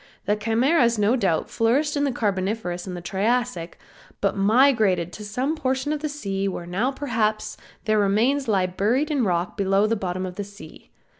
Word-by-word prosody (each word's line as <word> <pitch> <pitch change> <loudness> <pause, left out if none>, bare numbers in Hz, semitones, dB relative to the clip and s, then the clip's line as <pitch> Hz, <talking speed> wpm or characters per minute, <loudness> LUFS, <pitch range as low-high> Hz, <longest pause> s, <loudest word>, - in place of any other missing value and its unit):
The 210 - +2
Chimeras 235 +3 +2
no 210 +4 +3
doubt 190 -10 0
flourished 275 +7 +1
in 285 0 +1
the 275 - 0
Carboniferous 195 -4 -2
and 175 -2 -6
Triassic, 215 -3 -1 0.4
but 200 - 0
migrated 210 -4 +3
to 210 - -8
some 255 +9 -2
portion 265 -1 -1
of 305 - -2
the 305 0 -3
sea 200 -9 -3
where 180 -2 -4
now 195 +9 0
perhaps 230 -6 -1 0.3
their 215 -1 +2
remains 230 +8 +2
lie 195 -4 +2
buried 225 - 0
in 280 -4 +1
rocks 175 -3 0
below 195 0 +2
the 225 +1 +1
bottom 185 -2 -3
of 180 -1 -7
the 205 - -2
sea. 200 -6 -13
215 Hz, 175 wpm, -24 LUFS, 195-255 Hz, 0.4 s, no